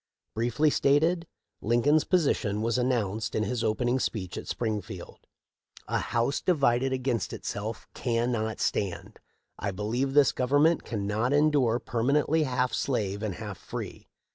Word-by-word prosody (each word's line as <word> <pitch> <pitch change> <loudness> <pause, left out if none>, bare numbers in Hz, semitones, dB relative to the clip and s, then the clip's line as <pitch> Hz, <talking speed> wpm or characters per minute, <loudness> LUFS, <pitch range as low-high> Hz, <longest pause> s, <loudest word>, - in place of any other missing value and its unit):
Briefly 120 +7 +1
stated, 160 +6 +2 0.3
Lincoln's 140 +7 +3
position 120 - +1
was 115 +2 +1
announced 110 -4 -1
in 110 - +1
his 115 +2 -2
opening 120 +3 +1
speech 95 -8 -3
at - - -6
Springfield: 110 -5 -5 0.3
" - - -64 0.2
<A - - 0
house 120 +4 0
divided 135 -6 +2
against 130 -5 -1
itself 110 +2 -5
cannot 115 -2 -1
stand. 95 -4 -2 0.4
1 100 -2 -3
believe 120 +7 -1
this 145 -2 +6
Government 145 +6 +2
cannot 110 +3 -1
endure 145 -6 +3
perma 125 +5 +1
nently 160 0 +1
half 125 -1 0
slave 105 -6 -1
and 105 -5 -3
half 105 -4 -7
free. - - -7
120 Hz, 140 wpm, -28 LUFS, 110-140 Hz, 0.4 s, this